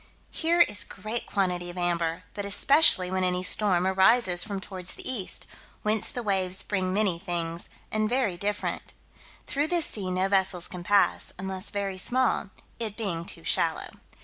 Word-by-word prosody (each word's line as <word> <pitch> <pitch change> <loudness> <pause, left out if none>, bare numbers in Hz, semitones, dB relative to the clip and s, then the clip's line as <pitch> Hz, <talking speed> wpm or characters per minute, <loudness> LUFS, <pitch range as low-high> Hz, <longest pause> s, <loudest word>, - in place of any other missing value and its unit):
Here 340 +1 +2
is 205 - +3
great 215 +5 -5
quantity 180 -3 -1
of 175 - -9
amber, 170 -1 -1
but 205 - -5
especially 200 - +5
when 185 0 0
any 180 0 0
storm 185 -2 +2
arises 190 -1 +3
from 200 -2 -4
towards 185 -2 -6
the - - -5
east; 220 -8 -3 0.4
whence 215 -1 +2
the 245 - -5
waves 190 -2 0
bring 185 -2 -2
many 195 -3 +1
things, 170 -2 -3 0.2
and 215 0 0
very 245 -7 0
different. 205 +3 -3 0.5
Through 290 +2 0
this 340 -1 +3
sea 195 -4 -2
no 185 +1 0
vessels 190 -3 +2
can 180 -3 -8
pass, 200 +3 +2
unless 190 +1 -4
very 195 -2 -3
small, 250 -1 +1 0.3
it 220 -3 -3
being 175 -7 -2
too - - -3
shallow. - - 0
190 Hz, 165 wpm, -27 LUFS, 180-215 Hz, 0.5 s, especially